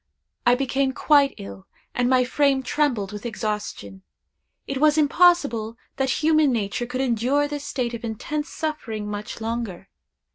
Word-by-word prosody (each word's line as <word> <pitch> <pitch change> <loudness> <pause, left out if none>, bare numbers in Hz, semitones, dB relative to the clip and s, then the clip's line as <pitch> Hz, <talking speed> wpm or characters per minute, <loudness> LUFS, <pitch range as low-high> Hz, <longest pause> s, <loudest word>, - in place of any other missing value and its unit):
I 245 - +6
became 270 +1 0
quite 285 -1 +3
ill, 100 -1 -10 0.3
and 245 0 +1
my 255 -1 +4
frame 270 +1 +2
trembled 250 -9 0
with 210 0 -7
exhaustion. 210 - -4 0.6
It 275 -1 -3
was 305 +1 +4
impossible 285 -8 +3 0.2
that 270 +2 0
human 310 -2 +4
nature 230 +1 -2
could 255 +2 -3
endure 260 +4 +1
this 290 -1 -5
state 245 -4 -2
of 235 - -6
intense 295 +7 -4
suffering 235 -10 -4
much 210 +2 -6
longer. 225 -5 -4
250 Hz, 145 wpm, -24 LUFS, 220-290 Hz, 0.6 s, I